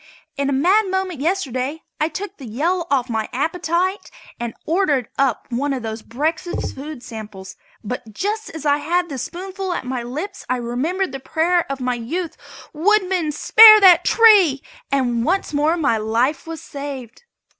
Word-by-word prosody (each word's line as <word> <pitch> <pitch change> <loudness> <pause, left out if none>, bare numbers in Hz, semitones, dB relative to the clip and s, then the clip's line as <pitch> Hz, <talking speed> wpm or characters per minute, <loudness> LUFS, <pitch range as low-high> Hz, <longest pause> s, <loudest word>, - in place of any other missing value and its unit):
In 280 0 -1
a - - 0
mad 370 +10 +3
moment 380 -4 -2
yesterday 290 -3 -2 0.2
I 305 - +2
took 395 +5 -7
the 265 - -10
Yale 305 +12 0
lock 345 -1 -5
off 260 -3 +1
my 220 -3 -2
appetite 345 +7 -1 0.3
and 235 -1 -4
ordered 310 - +1
up 270 -4 +1
one 275 +4 -1
of 255 -3 -4
those 220 0 -5
breakfast 315 +10 -3
food 280 -2 -8
samples, 210 -4 -9 0.3
but 225 0 -6
just 420 - -3
as 320 -2 -8
I 290 0 +3
had 345 +4 -1
the 275 -3 -5
spoonful 375 - -5
at 300 - -4
my 250 -1 -3
lips 310 +12 -6
I 255 - +2
remembered 270 +10 -2
the 270 - -6
prayer 330 +3 0
of 275 - -4
my 250 -1 -1
youth: 310 +9 -4 0.4
"Woodman, 365 -1 +1
spare 430 +8 +8
that 360 -3 +7
tree!" 400 - +5 0.3
and 245 -4 +1
once 360 +2 -1
more 300 +4 +2
my 285 -8 +1
life 235 +8 0
was 325 -1 -7
saved. 275 - -8
295 Hz, 170 wpm, -20 LUFS, 255-360 Hz, 0.4 s, spare